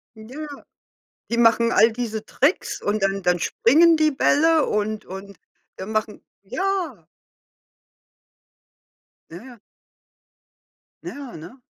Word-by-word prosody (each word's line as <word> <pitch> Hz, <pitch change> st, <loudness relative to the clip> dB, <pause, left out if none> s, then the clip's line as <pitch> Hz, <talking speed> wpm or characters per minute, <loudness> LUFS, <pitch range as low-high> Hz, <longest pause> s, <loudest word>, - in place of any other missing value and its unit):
Ja. 255 Hz, +8 st, -9 dB, 0.9 s
Die 235 Hz, -, -1 dB
machen 230 Hz, 0 st, +4 dB
all 225 Hz, -1 st, +4 dB
diese 220 Hz, -2 st, -4 dB
Tricks 280 Hz, -, -1 dB
und 205 Hz, 0 st, -1 dB
dann 195 Hz, 0 st, -1 dB
dann 180 Hz, 0 st, +2 dB
springen 320 Hz, -, +4 dB
die 310 Hz, 0 st, +3 dB
Bälle 315 Hz, +3 st, +3 dB
und 210 Hz, +1 st, -2 dB
und 195 Hz, +1 st, -10 dB, 0.4 s
dann 195 Hz, +4 st, -7 dB
machen 215 Hz, 0 st, -3 dB, 0.2 s
ja. 300 Hz, -, -3 dB, 2.3 s
Ja, 170 Hz, -, -8 dB
ja. 245 Hz, +3 st, -13 dB, 1.5 s
Ja, 275 Hz, -7 st, -8 dB
ne? 180 Hz, +12 st, -13 dB
230 Hz, 105 wpm, -22 LUFS, 205-285 Hz, 2.3 s, machen